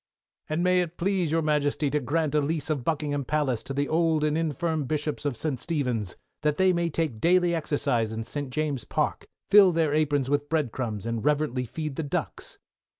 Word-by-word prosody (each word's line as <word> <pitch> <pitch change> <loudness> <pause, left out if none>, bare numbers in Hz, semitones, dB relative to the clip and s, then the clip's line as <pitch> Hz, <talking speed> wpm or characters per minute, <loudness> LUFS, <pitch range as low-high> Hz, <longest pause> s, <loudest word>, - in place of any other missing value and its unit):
And 155 +3 0
may 180 0 +4
it 175 -1 -5
please 185 -3 0
your 165 0 +1
Majesty 150 -1 +1
to 150 - +1
grant 150 +2 -1
a 150 - +3
lease 155 +1 -1
of 140 -5 -1
Buckingham 145 -2 -1
Palace 135 -4 0
to - - -8
the 140 +1 0
old 160 -1 +2
and 150 0 +1
infirm 160 -1 -1
Bishops 150 +1 -2
of 140 -5 -1
St. 145 -3 -2
Stephen's, 125 - -2 0.3
that 150 -1 +1
they 190 -1 +4
may 170 -1 0
take 150 -8 -2
daily 175 0 +4
exercise 140 -8 0
in 110 0 -4
St. 145 +3 -5
James's 145 -2 -2
Park, - - -1 0.2
fill 200 -2 +8
their 160 -3 +1
aprons 145 -3 +1
with 145 +1 0
bread 155 -7 0
crumbs, 110 -5 -4
and 115 -1 -2
reverently 145 -4 0
feed 150 +1 -5
the - - 0
ducks! 145 - -4
150 Hz, 200 wpm, -26 LUFS, 140-165 Hz, 0.3 s, fill